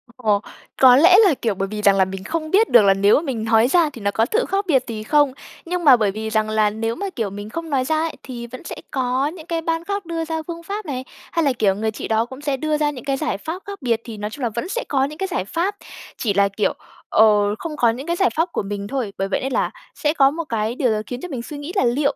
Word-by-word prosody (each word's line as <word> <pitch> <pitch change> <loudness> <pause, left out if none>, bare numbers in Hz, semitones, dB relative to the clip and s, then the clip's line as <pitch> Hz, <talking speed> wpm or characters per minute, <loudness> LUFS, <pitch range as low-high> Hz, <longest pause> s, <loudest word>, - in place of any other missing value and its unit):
Ồ, 215 -5 +1 0.4
có 255 -1 +9
lẽ 340 +7 +7
là, 370 - +5
kiểu, 220 -4 0
bởi 195 +1 -2
vì 210 +1 -5
rằng 200 -1 +5
là 190 -1 +4
mình 190 0 -7
không 315 +6 -3
biết 435 +4 +4
được 240 - +7
là 195 -1 +5
nếu 200 +2 +4
mà - - +2
mình 260 -8 -3
nói 225 +1 +4
ra 335 +1 +3
thì 235 - -10
nó 200 0 0
có 225 - +2
thự 445 - 0
khác 395 +1 -1
biệt 265 -6 +3
gì 220 -2 -5
không. 290 +2 +3 0.3
Nhưng 355 +1 -2
mà 280 -5 +8
bởi 210 -4 +1
vì 220 +2 -4
rằng 215 0 0
là 215 -1 +2
nếu 225 +2 -3
mà, 400 +7 -4
kiểu, 225 -5 -1
mình 205 +2 -8
không 330 +5 -5
nói 265 -3 +1
ra 315 - +1
ấy, 325 0 -2
thì 240 -2 -7
vẫn 255 +2 -10
sẽ - - -6 0.2
có 260 0 0
những 320 0 -8
cái 335 -1 -2
ban 330 0 -1
khác 400 0 -3
đưa 330 -1 -3
ra 320 0 -3
phương 335 -1 -6
pháp 410 +5 -5
này 260 -4 -4 0.3
hay 335 -2 +1
là, 275 - +3
kiểu, 205 -5 +2
người 220 +2 -1
chị 215 - -6
đó 225 +1 +1
cũng 260 +3 -11
sẽ 285 -2 -1
đưa 305 +2 0
ra 300 -1 +1
những 255 -4 -10
cái 275 -1 0
giải 305 -9 -2
pháp 330 - -6
khác 400 -5 -7
biệt. 230 -3 0
Thì 225 -3 -8
nói 210 0 -4
chung 255 +4 -8
là 235 - +1
vẫn 235 - -4
sẽ - - -2
có 270 -2 +2
những 300 +2 -7
cái 385 - -2
giải 340 - -2
pháp, 345 - -1 0.4
chỉ 215 -5 0
là, 200 0 +3
kiểu, 200 +2 0 0.4
ờ, 210 -1 +4
không 320 -2 -5
có 235 - +4
những 255 +7 -4
cái 340 - 0
giải 380 +1 +3
pháp 330 +2 +1
của - - -2
mình 200 0 -5
thôi. 245 -6 -3
Bởi 195 - -1
vậy 195 - -1
nên 270 - -2
là - - 0 0.2
sẽ 295 0 0
có 275 -3 +4
một 335 +2 -4
cái 225 +1 -1
điều 255 -2 +1
gì 220 - +2
đó 215 - -1
khiến 245 0 -6
cho - - -5
mình 260 -6 -4
suy 290 +5 -8
nghĩ 290 +4 -6
là 260 - +3
"Liệu 275 +4 +1
255 Hz, 305 wpm, -21 LUFS, 215-320 Hz, 0.4 s, có